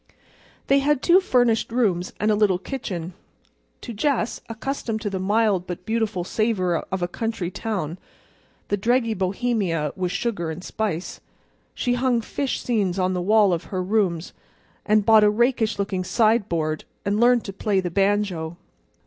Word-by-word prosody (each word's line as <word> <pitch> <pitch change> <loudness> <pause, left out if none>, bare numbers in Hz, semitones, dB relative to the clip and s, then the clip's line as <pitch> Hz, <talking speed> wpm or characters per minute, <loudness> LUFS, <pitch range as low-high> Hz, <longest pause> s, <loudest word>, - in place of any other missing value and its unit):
They 275 +1 +4
had 285 -1 +1
two 355 +2 +6
furnished 245 -10 +2
rooms 195 -7 +1
and 215 +1 +2
a - - +3
little 205 -3 +3
kitchen. 185 -6 -5 0.7
To 235 - -7
Jess, 245 +1 -1
accustomed 230 -1 -3
to 205 -2 -3
the 190 - -2
mild 200 -2 +1
but 180 0 -6
beautiful 220 -4 -1
savor 185 -4 0
of 185 +2 -4
a - - +1
country 200 -2 -3
town, 185 -6 -4 0.7
the 205 - +1
dreggy 230 +2 +1
Bohemia 190 - -1
was 180 -2 -2
sugar 180 -5 -2
and 160 +3 -6
spice. 195 -6 -3 0.5
She 245 - 0
hung 245 -1 +1
fish 270 +4 -3
seines 200 -7 0
on 185 0 +1
the 180 - -1
walls 205 0 +4
of 170 - -3
her 185 -2 -3
rooms, 185 -4 0 0.5
and 215 -1 +3
bought 220 -1 +7
a 210 - +6
rakish 230 0 +1
looking 195 -2 -2
sideboard, 180 -8 +1 0.2
and 200 +1 0
learned 240 0 +4
to 195 - -6
play 200 0 0
the 180 -2 -2
banjo. 195 -4 0
205 Hz, 160 wpm, -23 LUFS, 180-230 Hz, 0.7 s, bought